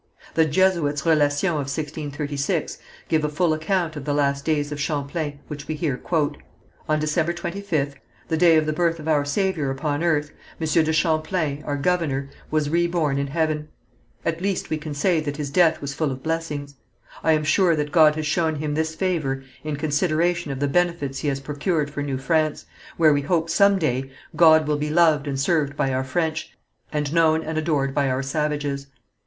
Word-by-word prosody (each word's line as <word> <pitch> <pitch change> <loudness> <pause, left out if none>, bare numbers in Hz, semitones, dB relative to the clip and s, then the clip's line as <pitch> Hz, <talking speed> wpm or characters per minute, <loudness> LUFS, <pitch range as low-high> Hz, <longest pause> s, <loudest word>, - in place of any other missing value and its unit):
The 160 - +4
Jesuits' 155 -3 +1
Relations 145 -3 +3
of 185 -3 +2
1636 145 0 -3 0.3
give 155 -1 +1
a 150 - +1
full 160 +2 +1
account 160 +1 -1
of 145 - -6
the 145 0 -1
last 140 -1 +1
days 150 -2 0
of 145 0 -4
Champlain, 145 0 -3
which 150 0 -7
we 155 - -2
here 150 -4 -1
quote: 150 +2 -1 0.5
"On 155 0 +2
December 155 +2 0
25th, 170 -5 -2 0.3
the 160 - 0
day 165 0 +5
of 155 - +2
the 155 - -1
birth 165 +1 +1
of 155 - -8
our 150 -2 +3
Saviour 155 -1 0
upon 145 +2 -2
earth, 150 -3 +1 0.3
Monsieur 160 0 +2
de 160 0 +1
Champlain, 155 -1 0
our 145 -1 -1
governor, 140 -4 0 0.2
was 155 -1 +1
reborn 170 -4 +1
in 140 - -1
Heaven; 155 0 -1 0.6
at 165 0 -1
least 195 0 -2
we 155 - 0
can 150 -1 -6
say 170 +3 +2
that 145 -2 -4
his 145 -2 -4
death 165 0 +3
was 140 -1 -4
full 145 0 -1
of 130 0 -7
blessings. 155 -3 -3 0.5
I 160 - +4
am 155 -1 +1
sure 170 +2 +3
that 150 -1 -2
God 155 -3 +6
has 155 0 -3
shown 160 +1 +1
him 150 0 -3
this 160 +1 -1
favour 155 -8 -1 0.2
in 155 -1 -3
consideration 160 +3 0
of 135 - -4
the 145 - +1
benefits 170 -3 0
he - - -3
has 135 -1 0
procured 150 +2 -1
for 145 - -4
New 140 -2 -2
France, 155 +3 0 0.3
where 155 -3 +5
we 145 - +1
hope 165 +2 0
some 200 -1 +5
day 135 -6 -1 0.3
God 160 -2 +6
will 150 -1 +1
be 150 +1 -2
loved 155 -3 +3
and 135 -1 -2
served 145 -1 +1
by 135 - +1
our 130 +1 0
French, 160 +3 -2 0.3
and 150 -1 -2
known 160 -1 +3
and 160 0 -4
adored 145 -4 0
by 140 -1 +1
our 130 +1 -1
savages. 145 -1 -2
155 Hz, 195 wpm, -23 LUFS, 145-165 Hz, 0.6 s, God